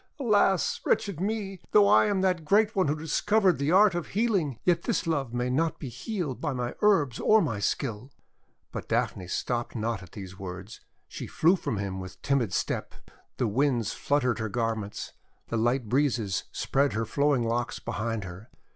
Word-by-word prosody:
Alas! 205 - +2
wretched 200 -6 0
me! 195 -1 -3
though 205 -1 +7
I 210 - +5
am 200 -2 +1
that 180 -3 +1
great 210 +7 +3
one 190 -5 +2
who 145 - +1
discovered 185 +4 +2
the 140 +3 +1
art 195 +1 +6
of 175 -1 -3
healing, 195 - 0
yet 175 -2 +2
this - - -1
love 145 -7 -1
may 125 +1 -1
not 155 +6 0
be 140 - -6
healed 145 - -4
by 145 - -1
my 125 -1 -3
herbs 165 - +3
or 220 - +5
my 115 - -1
skill!' 115 +3 -2 0.6
But - - -6
Daphne 90 - -1
stopped 120 +7 -2
not 115 -2 -2
at 90 -2 -14
these 95 -1 -9
words; 95 +2 -8 0.3
she - - -7
flew 170 +4 +3
from 125 - -3
him 95 -1 -3
writh 95 0 -8
timid 135 -8 +1
step. - - -2 0.4
The 120 - +1
Winds 120 -1 +1
flut 145 -1 0
tered 125 -2 0
her 110 -1 -2
garments, 110 -2 -3 0.4
the 115 - -1
light 120 +1 +1
breezes 120 -6 0
spread 140 +1 +1
her 115 +2 -1
flowing 140 +2 +1
locks 115 +1 -1
behind 115 0 -3
her. 95 +4 -10
135 Hz, 180 wpm, -27 LUFS, 115-180 Hz, 0.6 s, though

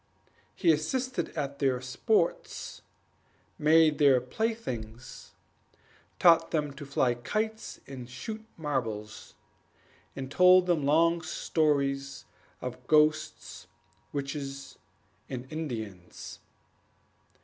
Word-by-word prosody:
He 170 - +4
assisted 245 - -1
at 140 -1 -3
their 130 -3 +2
sports, 165 - -1 0.8
made 155 0 +5
their 140 -3 +6
playthings, 125 - -5 0.8
taught 165 -2 +5
them 150 -3 -1
to 140 0 -9
fly 130 -3 +2
kites 215 - -3
and 125 -3 -9
shoot 215 - -6
marbles, 115 -9 -4 0.8
and 135 -1 -6
told 180 +3 +6
them 165 -6 +1
long 165 +3 +4
stories 140 -4 0 0.4
of 125 0 -7
ghosts, 155 0 +1 0.4
witches, 140 -1 -5 0.5
and 125 -1 -5
Indians. 110 - -6
145 Hz, 90 wpm, -29 LUFS, 130-165 Hz, 0.8 s, their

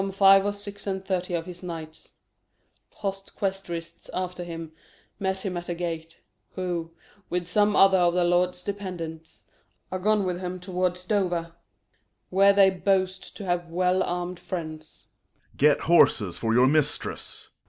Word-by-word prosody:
Some 195 - -2
five 195 0 +6
or - - +1
six 205 0 -5
and 190 -1 -3
thirty 180 -2 -1
of 165 -1 -3
his 180 -1 -8
knights, 160 -3 -7 0.7
Hot 195 -2 -5
questrists 175 -4 -4
after 180 -1 -3
him, 165 -2 -7 0.5
met 190 0 -2
him 185 -2 -2
at 175 0 -5
gate; 165 -1 -5 0.4
Who, 175 -3 -3 0.4
with 180 0 -1
some 205 +3 +2
other 195 -1 +6
of 175 0 +3
the 180 - +3
lord's 180 +1 +1
dependants, 175 -5 -6 0.5
Are 185 - -2
gone 210 +2 +2
with 180 -1 -2
him 185 0 -5
towards 180 0 -2
Dover, 175 -5 0 0.8
where 195 +2 +6
they 195 -1 +5
boast 190 0 -1
To 205 - -7
have 175 -1 -1
well 180 +2 +1
armed 175 0 -3
friends. 155 -3 -7 0.5
Corn. - - -26
Get 145 0 +4
horses 110 - +4
for 115 - 0
your 125 +1 +6
mistress. 150 +1 +1
180 Hz, 155 wpm, -26 LUFS, 170-195 Hz, 0.8 s, five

